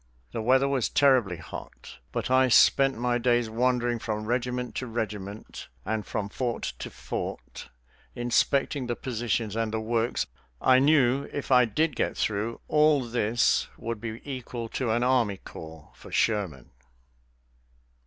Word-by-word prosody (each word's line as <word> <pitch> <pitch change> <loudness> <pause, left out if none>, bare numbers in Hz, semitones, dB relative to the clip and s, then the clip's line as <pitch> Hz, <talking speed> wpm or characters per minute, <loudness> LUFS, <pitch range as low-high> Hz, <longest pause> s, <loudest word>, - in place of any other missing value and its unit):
The 115 - -3
weather 130 +4 +4
was 135 -4 0
terribly 130 -11 +3
hot, - - -10
but - - -3
I 130 0 +5
spent 135 +1 +5
my 120 0 0
days 120 -2 +2
wandering 120 0 +1
from 110 -1 -3
regiment 125 +1 -2
to 130 - -3
regiment 105 -3 -5 0.2
and 110 0 -1
from 105 -1 -3
fort 120 +3 -3
to - - -5
fort, - - -6 0.5
inspecting 125 +3 +1
the 120 - -1
positions 115 -3 -2
and 115 -1 -1
the 110 - -1
works. 115 +1 0 0.3
I 130 0 +5
knew 140 -2 +3
if 145 - -5
I 125 -1 +7
did 145 +6 0
get - - -1
through, 110 +2 -1
all 150 -2 +4
this 115 0 +2
would 115 -2 -5
be 115 -1 -6
equal 125 -4 -5
to 125 0 -2
any 120 +2 +2
army 120 -6 +2
corps 80 -4 -11
for - - -14
Sherman. 95 - 0
120 Hz, 145 wpm, -27 LUFS, 110-130 Hz, 0.5 s, I